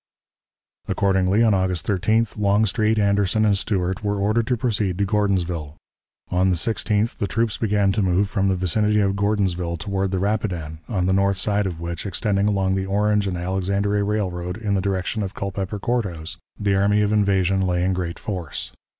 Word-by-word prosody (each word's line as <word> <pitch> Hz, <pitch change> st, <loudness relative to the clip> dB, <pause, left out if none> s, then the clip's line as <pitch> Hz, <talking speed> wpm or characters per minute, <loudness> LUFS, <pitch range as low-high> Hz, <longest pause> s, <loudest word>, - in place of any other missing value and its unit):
Accordingly, 95 Hz, +2 st, +2 dB
on 110 Hz, -2 st, +4 dB
August 95 Hz, -3 st, 0 dB
13th, 110 Hz, +3 st, +1 dB
Longstreet, 105 Hz, +2 st, +2 dB
Anderson, 100 Hz, +1 st, +2 dB
and 105 Hz, -2 st, +3 dB
Stuart 95 Hz, -2 st, -1 dB
were 105 Hz, 0 st, 0 dB
ordered 110 Hz, +3 st, +1 dB
to 125 Hz, -, +1 dB
proceed 105 Hz, -6 st, -1 dB
to 100 Hz, -, +1 dB
Gordonsville. 90 Hz, -7 st, -1 dB, 0.6 s
On 90 Hz, +1 st, +2 dB
the 90 Hz, -, +2 dB
16th 110 Hz, +3 st, 0 dB
the 100 Hz, -, 0 dB
troops 115 Hz, +1 st, -1 dB
began 100 Hz, -3 st, +2 dB
to 105 Hz, -, 0 dB
move 95 Hz, +1 st, +2 dB
from 100 Hz, -1 st, 0 dB
the 95 Hz, -, +2 dB
vicinity 105 Hz, +4 st, +1 dB
of 100 Hz, -1 st, +1 dB
Gordonsville 95 Hz, -4 st, 0 dB
toward 95 Hz, +3 st, -2 dB
the 95 Hz, -, -1 dB
Rapidan, 90 Hz, -6 st, -2 dB
on 95 Hz, -6 st, 0 dB
the 95 Hz, -, +2 dB
north 100 Hz, 0 st, +2 dB
side 105 Hz, +1 st, 0 dB
of 85 Hz, -3 st, -5 dB
which, 85 Hz, +3 st, -4 dB
extending 100 Hz, +1 st, 0 dB
along 95 Hz, -2 st, +1 dB
the 95 Hz, 0 st, -1 dB
Orange 105 Hz, +1 st, +1 dB
and 90 Hz, -2 st, -2 dB
Alexandria 100 Hz, +3 st, 0 dB
Railroad 90 Hz, -4 st, -2 dB
in 110 Hz, -3 st, -2 dB
the 95 Hz, -, +1 dB
direction 100 Hz, +2 st, -1 dB
of 95 Hz, -2 st, -4 dB
Culpeper 100 Hz, +1 st, -3 dB
Court 120 Hz, +3 st, 0 dB
House, 85 Hz, +1 st, -7 dB, 0.2 s
the 100 Hz, -2 st, +1 dB
army 100 Hz, +2 st, +3 dB
of 105 Hz, +1 st, +1 dB
invasion 95 Hz, -2 st, +2 dB
lay 90 Hz, -2 st, 0 dB
in 95 Hz, +1 st, +1 dB
great 90 Hz, -2 st, -3 dB
force. 90 Hz, -8 st, -5 dB
100 Hz, 185 wpm, -22 LUFS, 95-105 Hz, 0.6 s, on